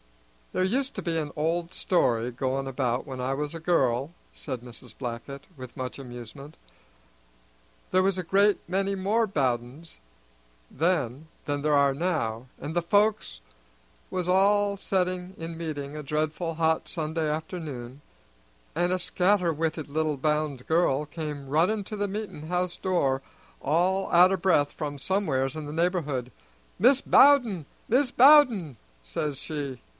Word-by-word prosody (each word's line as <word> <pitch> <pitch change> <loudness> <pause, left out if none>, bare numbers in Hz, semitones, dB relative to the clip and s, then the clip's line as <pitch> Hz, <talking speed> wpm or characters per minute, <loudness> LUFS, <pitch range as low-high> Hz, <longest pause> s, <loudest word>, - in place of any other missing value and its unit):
"There 185 - 0
used 260 +8 0
to - - -3
be 170 -2 -1
an 150 -2 -2
old 165 +3 -1
story 125 -12 +1
goin' 135 +2 -2
about 125 -2 -1
when 130 -2 -5
I 130 +2 -1
was 150 +3 -4
a - - -5
girl," 140 -4 +1 0.2
said 130 -5 -6
Mrs. 120 -1 -12
Blackett, 130 +2 -6
with 130 -3 -10
much 130 -1 -4
amusement. 125 +3 -9 1.3
"There 185 0 +4
was 195 0 +1
a 185 - -2
great 200 +3 +3
many 195 +2 0
more 205 +4 +1
Bowdens 130 - -2 0.7
then 155 -3 -1 0.2
than 145 -1 -2
there 150 0 +2
are 140 -1 +4
now, 135 -8 -2
and 160 - -6
the 175 - +2
folks 200 - +1 0.7
was 180 -1 -2
all 200 +2 +3
setting 185 -1 -2
in 165 0 -6
meeting 150 -3 -5
a 150 - -6
dreadful 155 +3 -2
hot 160 0 +1
Sunday 160 -1 -2
afternoon, 150 -5 -5 0.7
and 175 +2 +1
a 185 - +1
scatter 180 -1 +2
witted 155 0 -2
little 155 0 -1
bound 150 -2 -1
girl 155 -3 +2
came 150 -2 -6
running 175 +9 +2
to 215 - -6
the 205 -1 -2
meetin' 200 -7 -6
house 180 0 -1
door 140 -8 0 0.4
all 180 +6 +1
out 180 +2 +6
o' - - +1
breath 170 -6 +2
from 145 -2 -4
somewheres 140 -6 0
in 155 -1 -5
the 145 - -6
neighborhood. 155 -7 -1 0.5
'Mis' 255 +6 +5
Bowden, 245 - +5 0.2
Mis' 255 +2 +2
Bowden!' 245 - +6 0.3
says 135 - -3
she. 140 -4 -5
160 Hz, 150 wpm, -27 LUFS, 140-185 Hz, 1.3 s, out